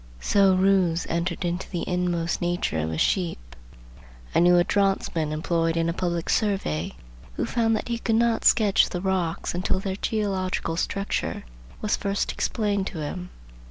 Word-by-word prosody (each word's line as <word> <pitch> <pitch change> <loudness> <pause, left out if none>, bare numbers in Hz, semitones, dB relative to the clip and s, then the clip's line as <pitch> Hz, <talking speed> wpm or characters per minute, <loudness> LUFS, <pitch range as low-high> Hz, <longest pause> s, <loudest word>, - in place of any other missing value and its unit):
So 195 - +4
Roos 185 -3 +2
"entered 170 +1 -1
into 175 +1 -3
the 175 - -3
inmost 175 -2 -1
nature 175 - -1
of 80 +1 -1
a 80 - -3
sheep." 80 - -1 0.8
I - - +4
knew 175 +1 +6
a 175 - +5
draughtsman 190 -6 0
employed 165 +1 0
in 165 0 +1
a - - -1
public 170 -2 -2
survey 195 - 0 0.4
who - - -1
found 225 -2 +1
that - - -3
he 235 -1 -2
could 225 -1 0
not 230 0 +2
sketch 210 -4 +4
the 180 - -3
rocks 180 -3 -1
until 185 +1 0
their 190 0 -3
geological 190 -6 -1
structure 195 +3 -2 0.4
was 210 - +1
first 200 0 -1
explained 205 -3 -1
to - - -6
him. 180 +4 -5
180 Hz, 160 wpm, -25 LUFS, 170-200 Hz, 0.8 s, knew